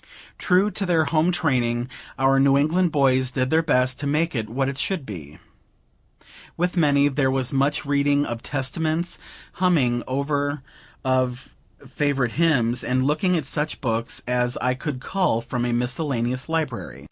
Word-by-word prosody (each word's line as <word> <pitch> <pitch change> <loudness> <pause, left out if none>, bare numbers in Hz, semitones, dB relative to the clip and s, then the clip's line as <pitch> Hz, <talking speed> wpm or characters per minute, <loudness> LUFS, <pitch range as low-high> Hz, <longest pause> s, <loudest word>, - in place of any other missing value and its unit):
True 190 +3 +3
to 200 - -1
their 165 -3 +3
home 160 +4 +2
training, 125 -8 0 0.3
our 135 0 +3
New 135 0 +4
England 165 +5 +2
boys 130 -3 +3
did 130 0 -1
their 160 +1 +4
best 130 -5 +1
to 145 - -3
make 160 +4 0
it 110 -4 -3
what 135 +3 -1
it 135 0 -4
should 175 -3 -1
be. 80 - -9 1.2
With 180 +2 0
many, 145 -4 +3
there 135 -1 +1
was 130 -1 -1
much 140 +3 +1
reading 145 0 +2
of 115 -1 -5
Testaments, 155 +5 -2 0.3
humming 145 -10 +2
over 145 +1 -1 0.4
of 130 -1 -1 0.3
favorite 140 -5 0
hymns, 130 -7 +2
and 130 +1 0
looking 155 +6 +1
at 155 - -3
such 150 +2 -2
books 115 -3 -1
as 125 0 0
I 125 - 0
could 130 0 -5
cull 185 -8 0
from 120 +1 -3
a 120 - -1
miscellaneous 125 +1 -2
library. 155 -7 -3
140 Hz, 160 wpm, -23 LUFS, 125-155 Hz, 1.2 s, New